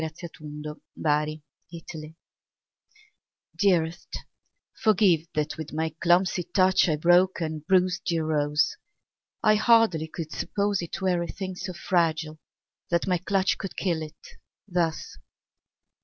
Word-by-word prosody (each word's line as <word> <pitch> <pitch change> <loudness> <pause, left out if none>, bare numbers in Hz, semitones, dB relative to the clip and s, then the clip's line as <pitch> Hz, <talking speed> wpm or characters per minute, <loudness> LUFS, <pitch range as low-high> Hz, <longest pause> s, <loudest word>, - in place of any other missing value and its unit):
Stupidity 150 -1 -4 2.1
Dearest, 175 -4 +1 0.6
forgive 185 -7 +3
that 150 0 -1
with 155 -2 -7
my 160 0 -2
clumsy 180 +1 +3
touch 185 +1 +3
I 155 - +2
broke 175 +4 +4
and 155 -2 -3
bruised 185 0 +2
your 165 -2 0
rose. 150 - +1 0.7
I 215 - +6
hardly 215 -8 +4
could 160 0 -7
suppose 200 -1 -1
It 170 +2 -6
were 180 -2 +1
a 170 - -3
thing 190 -1 -5
so 185 0 -5
fragile 165 -3 0 0.5
that 170 -1 +1
my 180 -2 +1
clutch 190 +1 +1
Could 195 - -6
kill 170 -4 0
it, 155 -1 -8 0.5
thus. 175 -4 -2
170 Hz, 115 wpm, -26 LUFS, 155-185 Hz, 2.1 s, I